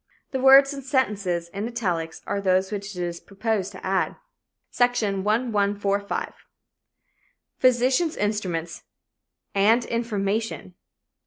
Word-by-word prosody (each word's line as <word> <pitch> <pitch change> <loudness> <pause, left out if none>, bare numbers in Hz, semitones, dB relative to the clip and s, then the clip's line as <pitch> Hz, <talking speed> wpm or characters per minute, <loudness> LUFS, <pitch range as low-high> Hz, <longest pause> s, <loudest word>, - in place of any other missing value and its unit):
The 265 - -2
words 270 +2 +7
and 275 -1 -7
sentences 205 - 0
in 200 +5 -4
italics 180 -9 -3
are 200 0 -2
those 190 0 +2
which 200 -1 -5
it 175 -1 -4
proposed 200 -1 -2
to 190 - -10
add: 190 -1 0 0.6
"(Section 230 -6 +1
1145.) 205 -2 0 1.3
Physicians' 255 +6 +3
instruments 185 -6 -2 0.7
and 220 +5 +3
information. 220 -3 -2
205 Hz, 100 wpm, -24 LUFS, 190-240 Hz, 1.3 s, words